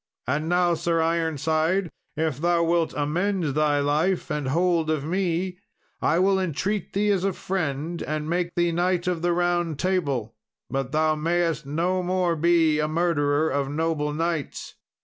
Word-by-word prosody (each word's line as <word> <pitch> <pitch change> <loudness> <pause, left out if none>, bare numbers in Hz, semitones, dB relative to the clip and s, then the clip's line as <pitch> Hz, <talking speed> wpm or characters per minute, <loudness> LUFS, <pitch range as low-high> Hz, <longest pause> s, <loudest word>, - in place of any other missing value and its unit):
And 150 +5 -1
now, 175 0 +3
Sir 165 0 0
Ironside, 160 +2 0 0.3
if 155 -4 -1
thou 170 0 +2
wilt 170 -1 +1
amend 170 +2 0
thy 150 0 +2
life 155 +6 0
and 150 -3 -2
hold 165 +2 +1
of 155 -3 -1
me, 180 +1 -1 0.4
I 160 - +2
will 190 +1 +3
entreat 190 +3 -2
thee 205 +1 +2
as 190 -2 +1
a 195 -1 +1
friend, 165 -3 -3
and 155 0 -3
make 170 +1 -1
thee 175 -1 +2
Knight 175 +1 0
of 180 -2 -1
the 175 0 +1
Round 175 -2 0
Table; 140 - -1 0.4
but 135 -1 -2
thou 155 +1 +2
mayst 165 -1 0
no 175 +5 0
more 180 -1 0
be 165 -1 +3
a 150 - +1
murderer 155 -2 +1
of 140 -1 -1
noble 150 0 -1
knights." 165 -1 -3
165 Hz, 160 wpm, -25 LUFS, 150-175 Hz, 0.4 s, now